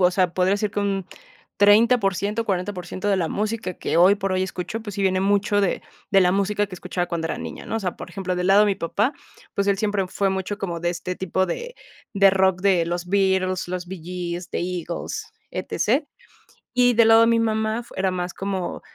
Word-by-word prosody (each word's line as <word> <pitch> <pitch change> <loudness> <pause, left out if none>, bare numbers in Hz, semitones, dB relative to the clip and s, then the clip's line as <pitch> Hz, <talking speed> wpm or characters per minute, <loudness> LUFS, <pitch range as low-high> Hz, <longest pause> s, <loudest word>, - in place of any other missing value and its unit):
o 180 -1 +5
sea, 180 -2 +1
podría 185 +2 +2
ser 210 0 -1
que 205 - -2
un 195 -2 -1 0.5
30 220 +5 +6
por 195 -3 +1
ciento 205 +4 -1
o - - -14
40 195 -1 -1
por 180 -1 -7
ciento 185 +3 -4
de 200 - +3
la 170 -3 0
música 215 -2 -2
que - - -1
hoy 185 +4 +6
por 195 -1 -2
hoy 185 0 +1
escucho, 190 +4 -4
pues, 205 -3 -7
sí 200 - -4
viene 190 -1 +2
mucho 205 +1 +2
de 190 - 0 0.3
de 195 - +5
la 180 -1 +4
música 200 +2 +1
que 195 - -9
escuchaba 180 0 -3
cuando 170 -2 -2
era - - -3
niña, - - -7
¿no?, - - -3
o 225 - -2
sea, 180 -3 -3
por - - -9
ejemplo, 185 -2 -3
del 180 +1 0
lado 195 +1 +6
de 210 - +5
mi 200 - +2
papá, 210 - -1 0.4
pues 200 - 0
él 200 -1 +2
siempre 205 -3 0
fue 195 +1 0
mucho 190 +2 -3
como 175 -5 -3
de 175 0 0
este 180 +1 -5
tipo 190 +1 0
de 480 - -5 0.4
de 195 -1 +5
rock 190 -1 +2
de 185 -3 +3
los 175 +1 -3
Beatles, 190 -1 +1
los 180 -1 -4
Bee 185 -1 -7
Gees, 175 0 -5
de - - -2
Eagles, 180 - -4 0.2
etc. - - 0 0.7
Y 245 -1 +5
del 230 0 +5
lado 225 0 +7
de 230 - +5
mi 230 0 +3
mamá, 220 +1 0
era 190 0 +1
más 180 -1 -3
como, 190 -2 -3
195 Hz, 235 wpm, -23 LUFS, 180-205 Hz, 0.7 s, lado